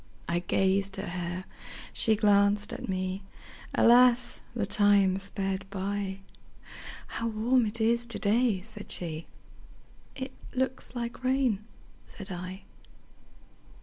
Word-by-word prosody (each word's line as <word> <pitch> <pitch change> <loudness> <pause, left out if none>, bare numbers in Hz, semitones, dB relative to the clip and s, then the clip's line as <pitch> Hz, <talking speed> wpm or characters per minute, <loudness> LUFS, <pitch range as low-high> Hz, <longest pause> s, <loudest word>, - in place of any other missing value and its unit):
I 170 0 +1
gazed 195 +2 +1
at 195 - -4
her, 175 +1 -4 0.5
she 220 - +4
glanced 205 0 +3
at - - -6
me; 185 +1 -2 0.5
Alas! 245 +1 +5
the 215 -4 0
time 200 -2 +4
sped 195 0 -3
by:"How 195 +3 -6
warm 230 +2 +2
it 220 +3 -1
is 235 +2 +2
to 235 - -3
day!" 215 -2 +2
said 210 -1 -6
she;"It 175 - -7 0.2
looks 260 0 -2
like 235 +1 -5
rain," 255 -5 +1 0.4
said 195 -1 -10
I. 185 +2 -6
205 Hz, 110 wpm, -29 LUFS, 190-235 Hz, 0.5 s, Alas